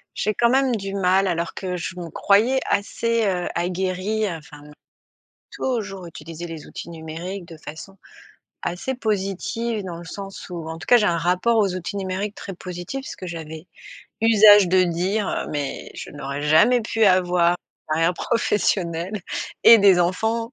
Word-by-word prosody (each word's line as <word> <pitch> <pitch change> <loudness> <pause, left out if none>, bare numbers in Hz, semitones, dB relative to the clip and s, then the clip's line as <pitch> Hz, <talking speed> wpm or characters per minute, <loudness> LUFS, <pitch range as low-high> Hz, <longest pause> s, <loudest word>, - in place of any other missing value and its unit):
J'ai 215 0 -1
quand 235 -1 +3
même 260 -1 +3
du 195 -1 -5
mal 195 0 +2
alors 170 -1 -2
que 185 -2 -3
je 180 +1 -5
me 170 -1 -6
croyais 230 +7 +3
assez, 230 +3 0
heu, 180 -3 0
aguerrie 185 +4 -1
enfin 150 -2 -10 0.9
toujours 200 -8 -3
utiliser 165 +1 -8
les 165 -3 -8
outils 170 - -8
numériques 170 +3 -7
de 165 -2 -11
façon 165 +6 -10 0.6
assez 185 +10 -3
positive 215 +1 -2
dans 175 -3 -6
le 170 - -10
sens 195 +2 -8
où 170 -2 -6
en 160 - -5
tout - - -10
cas 245 - +6
j'ai 210 - +2
un 170 -2 +2
rapport 180 +7 +2
aux 195 -4 +2
outils 185 +3 -5
numériques 195 +2 -3
très 195 - -7
positif. 180 +9 -6
Parce - - -7
que 185 - -7
j'avais 160 0 -7 0.5
usage 210 -3 +7
de 185 0 +4
dire, 185 +4 0
heu - - -2
mais 145 -2 -4
je - - -8
n'aurais 145 0 -5
jamais 160 +12 +5
pu 220 0 +1
avoir 180 -2 +4
une 155 -3 -6
carrière 165 +2 +2
professionnelle 190 -3 0 0.4
et 230 -1 +9
des 195 -3 +6
enfants 225 +7 0
185 Hz, 165 wpm, -23 LUFS, 170-210 Hz, 0.9 s, et